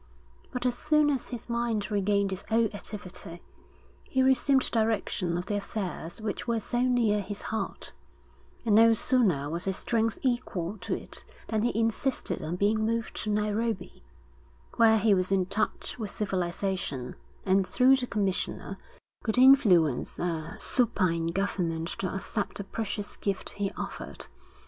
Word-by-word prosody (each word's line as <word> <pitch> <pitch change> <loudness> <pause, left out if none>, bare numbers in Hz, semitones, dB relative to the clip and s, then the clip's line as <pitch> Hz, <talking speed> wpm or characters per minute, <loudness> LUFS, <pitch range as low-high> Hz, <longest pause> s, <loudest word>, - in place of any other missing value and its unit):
But 250 0 -3
as 245 -1 +2
soon 300 +1 +3
as 270 -3 -2
his 245 -3 -7
mind 235 -3 -1
regained 200 -1 +1
its 190 - -5
old 225 -1 +2
activity, 185 -4 -7 0.6
he 260 -1 +1
resumed 265 0 +3
direction 215 -6 0
of 175 - -3
the 205 - -1
affairs 190 -4 -4
which 215 +1 -4
were 230 -1 +1
so 240 +3 -1
near 240 -5 +2
his 200 +1 -6
heart; 220 - -3 0.7
and 220 - +3
no 225 +2 +7
sooner 210 - +2
was 170 +4 -3
his 190 -1 0
strength 225 -1 0
equal 215 -7 -1
to 180 - -2
it - - -6 0.3
than 220 -2 +1
he 230 0 0
insisted 230 +4 0
on 160 +3 -3
being 210 +3 +2
moved 230 +1 -1
to 215 - -3
Nairobi, 210 -1 -1 0.8
where 225 -1 +6
he 215 0 +4
was 185 0 +1
in 190 -2 +3
touch 210 +5 -2
with 215 -3 -3
civilisation, 185 -8 -2 0.3
and, 190 0 +3
through 260 +2 +5
the 250 -1 -2
commissioner, 200 -4 -2 0.4
could 220 0 0
influence 205 - +5
a 165 -2 -3
supine 185 -9 +1
government 170 -3 -1
to 190 - -1
accept 205 +2 -3
the 200 - -4
precious 205 0 -4
gift 195 -2 -2
he 200 -1 -2
offered. - - -6
210 Hz, 150 wpm, -28 LUFS, 185-230 Hz, 0.8 s, no